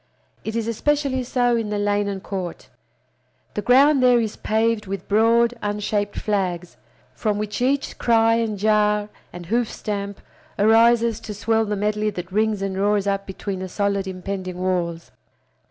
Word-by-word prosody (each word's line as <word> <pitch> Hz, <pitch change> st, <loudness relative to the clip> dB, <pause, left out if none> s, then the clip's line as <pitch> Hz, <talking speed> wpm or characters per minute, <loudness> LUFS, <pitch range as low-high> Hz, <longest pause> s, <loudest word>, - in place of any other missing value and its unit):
It 220 Hz, -, -4 dB
is 230 Hz, -1 st, -1 dB
especially 275 Hz, +2 st, 0 dB
so 245 Hz, -1 st, +1 dB
in 225 Hz, -2 st, -2 dB
the 210 Hz, -, -1 dB
lane 205 Hz, 0 st, +1 dB
and 195 Hz, -1 st, -4 dB
court. 185 Hz, -3 st, -6 dB, 0.8 s
The 210 Hz, -, -2 dB
ground 270 Hz, +5 st, +5 dB
there 250 Hz, -1 st, +5 dB
is 220 Hz, -2 st, -2 dB
paved 220 Hz, -1 st, 0 dB
with 195 Hz, -1 st, -5 dB
broad 230 Hz, +3 st, +3 dB
unshaped 205 Hz, 0 st, -2 dB
flags, 185 Hz, -4 st, -2 dB, 0.4 s
from 210 Hz, -2 st, -1 dB
which 210 Hz, +1 st, -4 dB
each 275 Hz, +3 st, 0 dB
cry 225 Hz, -1 st, +4 dB
and 225 Hz, -3 st, -1 dB
jar 210 Hz, 0 st, +2 dB, 0.2 s
and 175 Hz, 0 st, -9 dB
hoof 230 Hz, +5 st, 0 dB
stamp 200 Hz, -1 st, -4 dB, 0.4 s
arises 230 Hz, +1 st, +4 dB
to 210 Hz, -2 st, -7 dB
swell 225 Hz, +2 st, +1 dB
the 210 Hz, 0 st, -2 dB
medley 210 Hz, +1 st, 0 dB
that 180 Hz, -3 st, -7 dB
rings 215 Hz, 0 st, +1 dB
and 195 Hz, -1 st, -2 dB
roars 205 Hz, 0 st, +2 dB
up 195 Hz, 0 st, -1 dB
between 190 Hz, 0 st, -5 dB
the 185 Hz, 0 st, -5 dB
solid 200 Hz, 0 st, -1 dB
impending 185 Hz, -1 st, -5 dB
walls. 175 Hz, -2 st, -2 dB
210 Hz, 160 wpm, -22 LUFS, 195-230 Hz, 0.8 s, ground